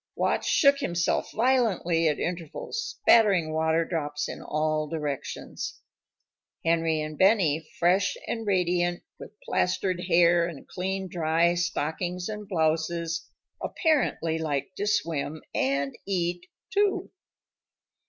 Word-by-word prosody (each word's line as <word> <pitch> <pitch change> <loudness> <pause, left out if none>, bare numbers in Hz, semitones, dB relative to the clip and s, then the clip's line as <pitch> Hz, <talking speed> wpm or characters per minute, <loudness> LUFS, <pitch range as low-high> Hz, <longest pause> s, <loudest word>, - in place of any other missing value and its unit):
Watch - - 0
shook 280 -1 +5
himself 175 0 0
violently 215 -9 +2
at 150 - +1
intervals, 175 - -4
spattering 190 -8 +4
water 160 +1 +2
drops 150 -3 -2
in - - -7
all 155 0 -1
directions. 150 -3 -5 0.9
Henry 165 -1 +2
and 155 0 -7
Benny, 175 -6 +3
fresh 185 +3 +2
and 225 -2 -4
radiant, 175 -2 +1 0.2
with - - -12
plastered 185 - 0
hair 170 -1 +4
and 165 -5 -9
clean 190 +1 -3
dry 170 0 +2
stockings 175 +1 -2
and 210 -1 -6
blouses, 165 0 -1 0.3
apparently 245 - 0
liked 155 +3 -2
to 205 - -2
swim 160 -6 -1
and 140 +1 0
eat, 175 -2 -1 0.3
too. 405 0 +1
170 Hz, 115 wpm, -27 LUFS, 160-190 Hz, 0.9 s, shook